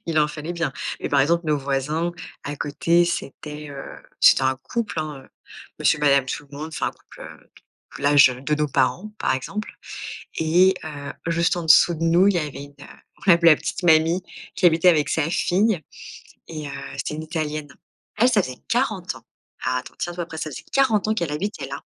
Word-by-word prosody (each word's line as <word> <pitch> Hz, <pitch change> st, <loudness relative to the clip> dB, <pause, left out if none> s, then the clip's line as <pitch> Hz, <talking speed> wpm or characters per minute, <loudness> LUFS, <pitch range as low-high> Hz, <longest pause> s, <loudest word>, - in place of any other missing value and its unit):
il 160 Hz, -2 st, 0 dB
en 150 Hz, -, +4 dB
fallait 155 Hz, +3 st, -6 dB
bien. 170 Hz, -5 st, -2 dB, 0.3 s
Et -, -, -3 dB
par 140 Hz, -1 st, +3 dB
exemple, 170 Hz, +4 st, +2 dB
nos 150 Hz, -1 st, +2 dB
voisins, 145 Hz, +5 st, -1 dB, 0.3 s
à 145 Hz, 0 st, -4 dB
côté, 170 Hz, +5 st, +2 dB
c'était, 150 Hz, -2 st, -5 dB
heu, 135 Hz, -1 st, -7 dB, 0.4 s
c'était -, -, +6 dB
un 130 Hz, 0 st, +2 dB
couple, 230 Hz, -8 st, -3 dB
hein, 150 Hz, -3 st, -6 dB
heu, -, -, -20 dB, 0.5 s
monsieur 150 Hz, -, +3 dB
madame 140 Hz, -2 st, +4 dB
tout-le-monde, 145 Hz, +3 st, -6 dB
enfin 155 Hz, -, -3 dB
un -, -, -6 dB
couple, -, -, -19 dB
heu, -, -, -13 dB, 0.5 s
l'âge, 145 Hz, -2 st, +6 dB
heu, 125 Hz, 0 st, -7 dB
de 150 Hz, +2 st, +1 dB
nos 150 Hz, 0 st, +1 dB
parents 175 Hz, +11 st, 0 dB
par -, -, +1 dB
exemple 200 Hz, -, -5 dB, 0.7 s
et 175 Hz, +4 st, +4 dB
heu, 145 Hz, -2 st, -6 dB, 0.2 s
juste 170 Hz, +1 st, +1 dB
en 170 Hz, -, -4 dB
dessous 160 Hz, +2 st, +6 dB
de 165 Hz, -, -6 dB
nous 175 Hz, +4 st, +5 dB
il 200 Hz, -, +2 dB
y -, -, +2 dB
avait 145 Hz, -3 st, -5 dB
une, 145 Hz, -, -14 dB
heu, -, -, -11 dB, 0.3 s
on 190 Hz, -, +1 dB
l'appelait 170 Hz, 0 st, +7 dB
la -, -, +4 dB
petite -, -, -4 dB
mamie, 165 Hz, +2 st, +4 dB, 0.3 s
qui 185 Hz, -, -3 dB
habitait 165 Hz, +2 st, +5 dB
avec 150 Hz, -4 st, +4 dB
sa 160 Hz, -1 st, +1 dB
fille, 190 Hz, +1 st, +1 dB, 0.7 s
et 155 Hz, -3 st, -6 dB
heu, -, -, -7 dB, 0.2 s
c'était 135 Hz, -, -3 dB
une 155 Hz, -, -5 dB
italienne. 155 Hz, -2 st, -3 dB, 0.5 s
Elle, 240 Hz, +3 st, +5 dB
ça 210 Hz, -4 st, +3 dB
faisait 130 Hz, -6 st, -7 dB
40 -, -, 0 dB
ans. -, -, -15 dB, 0.4 s
Attends, 125 Hz, 0 st, -2 dB
tiens 175 Hz, -, -3 dB
toi 175 Hz, 0 st, -3 dB
prêt 160 Hz, -1 st, -8 dB
ça 155 Hz, -, -4 dB
faisait -, -, -9 dB
40 225 Hz, -6 st, +2 dB
ans 220 Hz, -, +2 dB
qu'elle 170 Hz, -8 st, -2 dB
habitait 200 Hz, +8 st, -3 dB
là, -, -, -6 dB
155 Hz, 205 wpm, -23 LUFS, 145-175 Hz, 0.7 s, l'appelait